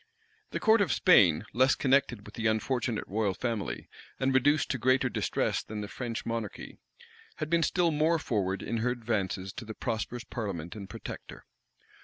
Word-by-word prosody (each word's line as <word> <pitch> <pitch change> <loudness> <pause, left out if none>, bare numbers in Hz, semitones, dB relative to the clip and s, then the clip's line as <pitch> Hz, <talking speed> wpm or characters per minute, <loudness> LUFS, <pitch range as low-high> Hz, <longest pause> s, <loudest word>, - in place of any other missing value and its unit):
The - - -3
court 220 0 +5
of 200 - +2
Spain, 90 - +5
less 130 +4 +4
connected 130 -5 +2
with - - -11
the 110 -1 -1
unfortunate 115 +1 0
royal 100 -1 0
family, 115 -4 -3 0.3
and 135 0 +1
reduced 145 +3 +3
to 130 - -2
greater 130 +3 +3
distress - - 0
than 105 -1 -6
the 105 - -4
French 120 +1 -5
monarchy, 115 -3 -5 0.6
had 155 +1 -4
been 170 0 +4
still 170 +1 +2
more 155 +2 +3
forward 100 -9 -1
in 115 - -2
her 115 +3 +1
advances 105 -6 -2
to 130 - -7
the 110 -1 -8
prosperous 120 0 -3
parliament 95 -7 -5
and 100 -3 -8
protector. - - -8
115 Hz, 170 wpm, -29 LUFS, 105-135 Hz, 0.6 s, court